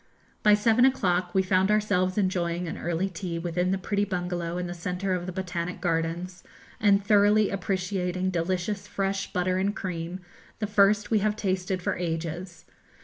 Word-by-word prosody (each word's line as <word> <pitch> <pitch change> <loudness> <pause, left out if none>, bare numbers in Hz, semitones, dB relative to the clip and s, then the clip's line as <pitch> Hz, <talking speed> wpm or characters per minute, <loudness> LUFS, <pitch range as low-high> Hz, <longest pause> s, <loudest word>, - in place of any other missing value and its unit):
By 210 -1 +6
seven 225 +3 +3
o'clock 185 -9 +2
we 190 - +4
found 190 +1 +2
ourselves 200 -3 +1
enjoying 180 -3 0
an - - -4
early 175 +3 -1
tea 180 -2 -5
within 175 +2 -1
the 190 - +1
pretty 200 +2 -1
bungalow 175 -3 -2
in 180 - -2
the 175 - -4
centre 180 +2 -2
of 180 0 -2
the - - -3
Botanic 180 -1 -4
Gardens, 170 +1 -2 0.4
and 200 -1 +3
thoroughly 210 0 +4
appreciating 185 -1 -1
delicious 185 +4 -2
fresh 195 0 -2
butter 185 +1 0
and 200 +2 0
cream, 175 0 -4 0.4
the 215 - -2
first 205 +1 +3
we 220 - +4
have 210 +1 +1
tasted 185 -2 -2
for - - 0
ages. 170 0 -4
185 Hz, 165 wpm, -27 LUFS, 175-200 Hz, 0.4 s, By